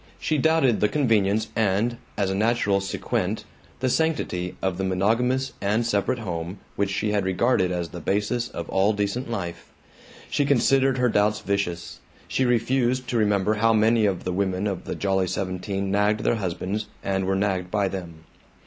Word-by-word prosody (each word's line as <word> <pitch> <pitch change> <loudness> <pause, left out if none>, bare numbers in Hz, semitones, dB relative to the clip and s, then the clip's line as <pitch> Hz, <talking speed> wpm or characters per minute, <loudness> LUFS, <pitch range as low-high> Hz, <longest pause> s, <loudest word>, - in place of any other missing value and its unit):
She 155 -2 0
doubted 160 -6 +3
the 105 - +3
convenience 110 -6 +2
and, 110 +3 +1 0.2
as 100 -2 +1
a - - 0
natural 105 -1 +2
sequent, 95 - -2 0.4
the 130 - +1
sanctity 125 - 0
of 95 -1 -2
the - - 0
monogamous 115 +8 +1
and 105 +4 +1
separate 115 +3 +1
home 90 -4 -4 0.2
which 100 0 0
she 105 +2 -1
had 105 -2 +1
regarded 95 0 +2
as 85 -2 -2
the 90 - -7
basis 105 +7 -1
of 85 -2 -6
all 95 +3 +3
decent 105 +5 -2
life. 90 -7 -5 0.6
She 145 - +1
considered 135 0 +3
her 125 -1 +3
doubts 105 0 +2
vicious. 85 -4 -2 0.3
She 130 - 0
refused 125 +1 +1
to 120 - 0
remember 105 -1 +2
how 115 +1 +3
many 110 0 +4
of 95 -3 -2
the 90 - -2
women 95 0 -1
of 100 -3 -3
the - - -4
Jolly 95 -1 0
Seventeen 95 +1 -3
nagged 105 +1 +2
their 115 - +1
husbands 95 +2 -3 0.2
and 95 -1 0
were 95 +1 +1
nagged 95 -2 0
by 100 0 +1
them. 85 -4 -7
105 Hz, 175 wpm, -24 LUFS, 95-115 Hz, 0.6 s, many